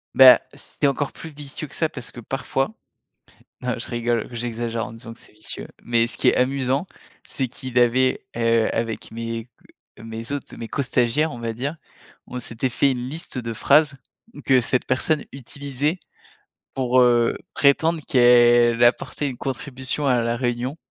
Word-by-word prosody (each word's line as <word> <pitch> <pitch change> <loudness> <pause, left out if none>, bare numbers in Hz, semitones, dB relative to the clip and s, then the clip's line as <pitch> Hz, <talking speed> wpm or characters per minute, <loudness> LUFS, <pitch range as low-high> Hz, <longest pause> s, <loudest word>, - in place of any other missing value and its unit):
Bah, 130 -1 +10
c'était 145 - -2
encore 140 +1 -1
plus 160 - -10
vicieux 145 +1 -7
que - - -14
ça. 160 -2 0
Parce 125 -3 -9
que, 120 - -10
parfois 135 0 -2 0.9
non, 125 0 -1
je - - -4
rigole. 120 -1 -1
J'exagère 115 -1 -3
en - - -9
disant 115 0 -10
que - - -18
c'est - - -17
vicieux. 110 - -8 0.2
Mais, 115 -1 +2
ce 115 - -4
qui - - +1
est - - +1
amusant, 135 +4 +1 0.4
c'est 130 -2 -2
qu'il 130 0 -2
avait, 130 +2 +3
heu, 115 -1 +3
avec 115 -1 -3
mes 115 +1 -5 0.5
mes 115 +3 -7
autres, 145 -2 -5
mes 115 - -6
co-stagiaires, 135 +3 +1
on 120 - -8
va 115 -1 -3
dire, 140 +7 -3 0.5
on 125 - -5
s'était 120 +1 -3
fait 135 +3 +2
une 125 0 -4
liste 155 -3 -6
de 115 -2 -3
phrases 145 +4 +4 0.5
que 130 -2 +5
cette 125 +2 0
personne 145 +4 0
utilisait 140 +5 -3 0.8
pour, 130 -1 +2
heu, 120 -1 +4 0.2
prétendre 160 +3 +3
qu'elle 120 -1 +5
apportait 140 +4 +1
une 125 - -6
contribution 135 +2 -3
à 125 -3 +3
la 115 0 0
réunion 125 +3 -2
125 Hz, 165 wpm, -23 LUFS, 115-140 Hz, 0.9 s, Bah